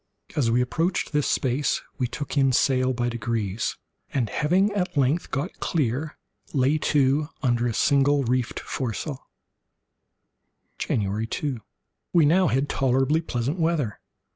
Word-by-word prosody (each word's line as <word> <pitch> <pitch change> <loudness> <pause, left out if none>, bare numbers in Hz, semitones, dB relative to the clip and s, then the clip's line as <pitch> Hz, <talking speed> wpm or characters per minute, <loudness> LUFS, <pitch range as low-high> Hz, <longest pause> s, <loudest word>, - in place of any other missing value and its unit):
As 130 -6 +2
we 120 +2 +3
approached 165 +9 -1
this 150 -2 +1
space 135 +2 +1 0.2
we 125 - +1
took 145 +5 -5
in 135 -2 +3
sail 130 0 +3
by 120 -1 -1
degrees, 115 -3 -2 0.3
and 120 -7 -1
having 185 +7 +2
at 180 -6 -2
length 140 +5 +1
got 140 +1 -3
clear, 150 0 -1 0.4
lay 140 +2 +2
to 145 +1 +2
under 120 -2 +2
a 115 - -1
single 140 0 +3
reefed 125 0 -1
foresail. 130 +2 -4 1.5
January 105 +1 -1
2.—We 145 - -3
had - - +4
now 180 0 +4 0.2
tolerably 135 +4 +2
pleasant 140 +2 -2
weather. 160 -9 0
135 Hz, 130 wpm, -25 LUFS, 120-150 Hz, 1.5 s, had